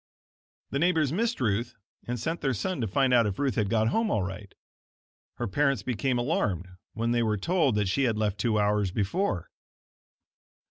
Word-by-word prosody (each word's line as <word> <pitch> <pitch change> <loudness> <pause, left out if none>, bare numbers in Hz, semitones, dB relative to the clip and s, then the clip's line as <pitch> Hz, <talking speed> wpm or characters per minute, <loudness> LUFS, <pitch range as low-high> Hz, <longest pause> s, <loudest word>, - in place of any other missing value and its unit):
The 140 - 0
neighbors 160 -4 +2
missed 230 +5 0
Ruth 115 +1 -1 0.3
and 120 0 -2
sent 165 +9 -3
their 135 -3 0
son 180 - -2
to 115 - 0
find 130 +6 +2
out 120 -3 +5
if 100 - -3
Ruth 140 -2 0
had 105 -4 0
got 110 -1 +2
home 225 - +1
all 105 - +1
right. 95 +1 -7 0.8
Her - - -3
parents 140 +5 +1
became 125 +1 0
alarmed 110 - 0 0.3
when 115 +1 -1
they 120 0 +2
were 110 -2 +1
told 155 - +1
that 105 -2 +1
she 135 +9 +1
had 115 -3 +1
left 105 -2 -1
two 110 +1 +1
hours 105 -1 +2
before. 100 - -1
120 Hz, 185 wpm, -28 LUFS, 105-140 Hz, 0.8 s, out